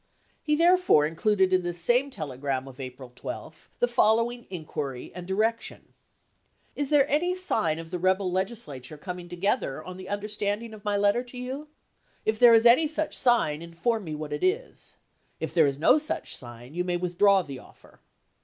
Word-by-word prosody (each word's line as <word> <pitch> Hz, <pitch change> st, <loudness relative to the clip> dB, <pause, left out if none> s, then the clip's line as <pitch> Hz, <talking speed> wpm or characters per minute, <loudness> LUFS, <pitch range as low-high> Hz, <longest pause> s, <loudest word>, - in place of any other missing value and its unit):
He 300 Hz, -1 st, +1 dB
therefore 345 Hz, -, +5 dB
in 155 Hz, -, -3 dB
cluded 190 Hz, 0 st, +2 dB
in 185 Hz, -, +4 dB
this 175 Hz, -1 st, -4 dB
same 245 Hz, +10 st, +2 dB
telegram 135 Hz, -, -4 dB
of 130 Hz, 0 st, -12 dB
April 130 Hz, -1 st, -8 dB
12 -, -, -8 dB
the 245 Hz, -, +2 dB
fol 220 Hz, -2 st, +4 dB
ise& -, -, +1 dB
lowing 240 Hz, 0 st, -7 dB
inquiry 150 Hz, -7 st, -5 dB
and 180 Hz, 0 st, -8 dB
direction: 220 Hz, +4 st, -2 dB, 0.8 s
"Is 285 Hz, -2 st, -2 dB
there 285 Hz, -2 st, +4 dB
any 345 Hz, +6 st, +1 dB
sign 170 Hz, -, +1 dB
of 165 Hz, 0 st, -8 dB
the 180 Hz, -, -3 dB
rebel 185 Hz, +1 st, +1 dB
Legislature 175 Hz, -, -4 dB
coming 180 Hz, +2 st, -7 dB
together 175 Hz, -, -1 dB
on 185 Hz, 0 st, -8 dB
the 185 Hz, 0 st, -9 dB
un 205 Hz, 0 st, -1 dB
derstanding 210 Hz, +2 st, -3 dB
of 210 Hz, -1 st, -12 dB
my 205 Hz, -1 st, 0 dB
letter 205 Hz, +3 st, +3 dB
to 250 Hz, 0 st, -10 dB
you 250 Hz, +2 st, -4 dB
1 300 Hz, -, -12 dB, 0.6 s
If 220 Hz, 0 st, 0 dB
there 240 Hz, -1 st, +8 dB
is 225 Hz, +1 st, +4 dB
any 255 Hz, +7 st, +6 dB
such 310 Hz, +1 st, -2 dB
sign, 230 Hz, -, +2 dB
inform 170 Hz, +7 st, -2 dB
me 155 Hz, -2 st, -4 dB
what 150 Hz, -1 st, -5 dB
it 150 Hz, -, -4 dB
is. 460 Hz, +7 st, -2 dB, 0.4 s
If -, -, -4 dB
there 160 Hz, -4 st, +5 dB
is 135 Hz, -1 st, -2 dB
no 165 Hz, -, +5 dB
such 305 Hz, -, -2 dB
sign, 120 Hz, +2 st, -11 dB
you 180 Hz, +1 st, -1 dB
may 180 Hz, -1 st, -1 dB
withdraw 185 Hz, +2 st, +3 dB
the 140 Hz, -4 st, -8 dB
offer." -, -, -19 dB
190 Hz, 195 wpm, -27 LUFS, 155-240 Hz, 0.8 s, there